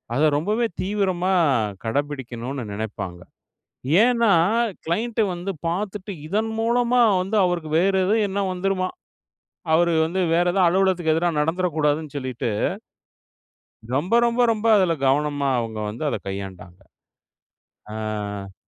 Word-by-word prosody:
அதை 150 - +3
ரொம்பவே 210 +9 0 0.2
தீவிரமா 190 -2 0 0.5
கடைப்பிடிக்கணும்னு 135 -1 -3
நெனைப்பாங்க. 100 -5 -5 0.8
ஏன்னா, 235 -2 +3 0.6
கிளைன்ட்டு 220 +7 0
வந்து 180 +3 -4 0.2
பார்த்துட்டு 200 +3 -3 0.2
இதன் 220 +5 -1
மூலமா 240 +1 +2 0.2
வந்து 195 +4 -3
அவருக்கு 175 -3 -1
வேற 195 +2 +2
எதுவும் 215 +2 +2
என்னா 200 +1 -2
வந்துருமா, 185 0 -1 0.9
அவர் 170 +1 +4
வந்து 175 +4 -2
வேற 175 +1 +3
எத 195 - +1
அலுவலகத்துக்கு 185 -3 +2
எதிரா 170 +2 +1
நடந்துட 175 +4 0
கூடாதுன்னு 150 0 0
சொல்லிட்டு 130 -4 -3 1.5
ரொம்ப, 170 - 0
ரொம்ப, 235 +1 0
ரொம்ப 220 0 -1
அதுல 185 -4 +3
கவனமா 145 0 +1
அவங்க 115 -2 -4
வந்து 110 +7 -7
அதை - - -2
கையாண்டாங்க. 95 -2 -7 1.2
ஆ. 105 -2 -5
175 Hz, 115 wpm, -23 LUFS, 135-195 Hz, 1.5 s, அவர்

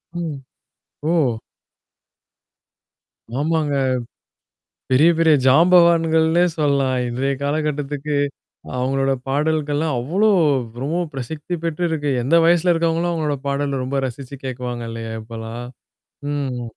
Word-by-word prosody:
ம். 165 -5 -3 0.7
ஓ! 130 -10 +1 2.0
ஆமாங்க, 150 -2 0 1.1
பெரிய, 150 +6 +5
பெரிய 160 -2 +5
ஜாம்பவான்கள்னே 165 +2 +5
சொல்லலாம், 140 -4 +1
இன்றைய 135 +3 -1
காலகட்டத்துக்கு 145 0 -2 0.6
அவங்களோட 135 +1 +1 0.2
பாடல்கள்லாம், 150 +1 0
அவ்ளோ 190 - +2 0.5
ரொம்ப 155 +6 -1 0.2
பிரசித்தி 150 +6 -5
பெற்று 165 +1 -1
இருக்கு 150 -2 -1
எந்த 155 +7 +3
வயசுல 175 +1 +4
இருக்கவங்களும் 165 +1 0
அவங்களோட 150 -3 -1
பாடல 140 -1 -1
ரொம்ப 135 +1 -1
ரசிச்சு 130 +2 -8
கேக்குவாங்க 125 -2 -4
இல்லையா 115 -1 -6
இப்பலாம்? 115 +1 -7 0.7
ம். 130 -4 -3
145 Hz, 95 wpm, -21 LUFS, 130-160 Hz, 2.0 s, பெரிய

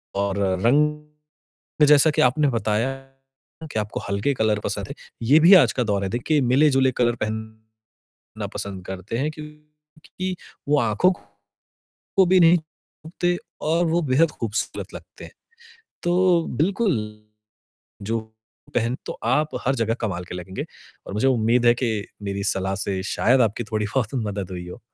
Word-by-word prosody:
और 100 0 -1
अ, 95 -2 +1
रंग 150 +4 +2 0.9
जैसा 150 +1 +6
कि 150 - 0
आपने 140 +4 +3
बताया 115 +1 0 0.8
कि 110 - -2
आपको 105 0 -3
हल्के 100 +7 0
कलर 110 -3 +1
पसंद - - -3
हैं। - - -7 0.3
ये 135 +7 +5
भी 170 +5 +7
आज 135 - +6
का 125 - -1
दौर 100 -2 0
है - - -1
देखिए 135 +6 0
मिले-जुले 135 -1 +4
कलर 120 -1 +1
पहनना 110 0 -7 0.6
पसंद 95 -2 -6
करते 95 +4 -5
हैं 150 +4 -1
क्योंकि 150 +4 -9 0.3
वो 145 0 +4
आँखों 115 - +2 1.1
को 190 -2 +6
भी 185 0 +4
नहीं 170 +1 +6
थकते 170 +2 -5 0.3
और 170 +2 +2
वो 170 +2 +1
बेहद 160 +4 +4
खूबसूरत 110 -5 -4
लगते - - -11
हैं। - - -12 0.7
तो 175 -1 +2
बिल्कुल 190 - +1 1.1
जो 115 0 0 0.5
पहनें 120 +2 0
तो - - -3
आप 150 +6 +1
हर 135 - +3
जगह 115 -1 0
कमाल 95 -5 -3
के 90 - -9
लगेंगे 90 +1 -6 0.4
और - - -7
मुझे 110 +6 +2
उम्मीद 120 -1 +2
है 120 - +6
कि 115 -4 -2 0.2
मेरी 100 0 -3
सलाह 95 -1 0
से 95 -2 -2
शायद 125 +4 +3
आपकी 115 +1 +1
थोड़ी 110 -1 -2
बहुत 130 -2 -1
मदद 100 -2 -4
हुई 90 -1 -6
हो। 90 - -10
120 Hz, 155 wpm, -23 LUFS, 105-150 Hz, 1.1 s, भी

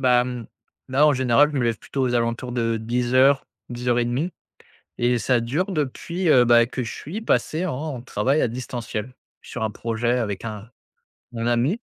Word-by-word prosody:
Bah, 125 -2 +4
mmh, 125 -3 -5 0.4
là, 140 +4 +4
en 150 - +5
général, 130 +3 +4
je 145 - -1
me 120 - +1
lève 115 -2 0
plutôt 135 - -4
aux 125 -1 +1
alentours 120 +1 -1
de 115 -2 0
10:00-10:30 125 +3 +1 0.7
et 120 0 +2
ça 125 +1 +2
dure 155 - -1
depuis, 170 +3 -2
heu, 125 -4 +6
bah, 120 -1 +5
que 130 +1 -4
je 115 - -5
suis 185 +10 -6
passé 170 -5 0
en 145 -3 -4
travail 130 +5 0
à - - +2
distanciel. 120 -1 -5 0.3
Sur - - -7
un 110 - 0
projet 115 +3 -1
avec 105 -3 -3
un 110 0 -6 0.6
mon 115 -1 -4
ami 125 - +1
125 Hz, 170 wpm, -23 LUFS, 115-135 Hz, 0.7 s, heu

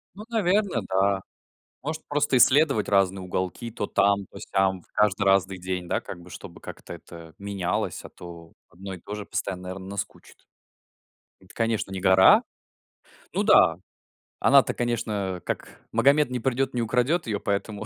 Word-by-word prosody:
Ну, 210 - -9
наверно, 200 - +1
да. 95 +1 +2 0.6
Может, 155 +2 -4
просто 145 -2 +1
исследовать 135 -3 +5
разные 95 -1 +2
уголки, 95 +6 -4
то 105 -2 -4
там, 100 -1 +2
то - - -11
сям, 95 -2 0
каждый 105 -1 +2
разный 95 -1 +2
день, 90 -1 -4
да, - - 0
как 90 - -9
бы, 90 - -14
чтобы - - -10
как-то - - -10
это 85 -1 -13
менялось, 100 -3 -3
а - - -10
то 85 -1 -12 0.2
одно 95 +2 -9
и 90 - -11
то 105 - -7
же 105 -1 -6
постоянно, 90 -2 -4
наверно, 95 +1 -7
наскучит. 100 0 -7 1.0
Это, - - -17
конечно, 115 -4 -1
не 95 - -4
гора. 95 0 +6 0.9
Ну - - 0
да, - - +5 0.6
она-то, - - +5
конечно, 105 -6 -2
как - - -5
Магомет, 145 0 +4
не 125 - -3
придёт, 135 +2 -1
не 120 - 0
украдёт 125 +9 +1
её, 105 -2 -1
поэтому 105 +1 -3
100 Hz, 160 wpm, -25 LUFS, 95-120 Hz, 1.0 s, гора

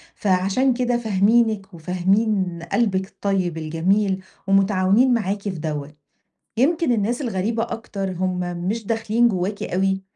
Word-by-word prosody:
فعشان 195 +7 +2
كده 245 0 0
فاهمينِك، 215 -2 +2
وفاهمين 185 +2 0
قلبِك 190 -5 +1
الطيب 190 -5 -2
الجميل، 185 +5 0 0.2
ومتعاونين 195 +5 +3
معاكِ 205 -3 -1
في 205 - -3
دوّة. 150 -4 -5 0.6
يمكِن 315 +3 +2
الناس 235 +3 0
الغريبة 225 -1 -1
أكتر 215 -4 -4
هُم 185 0 -2 0.3
مش 220 +2 -2
داخلين 225 +2 +2
جواكِ 200 -1 -2
أوي، 190 +1 0
195 Hz, 120 wpm, -22 LUFS, 185-225 Hz, 0.6 s, ومتعاونين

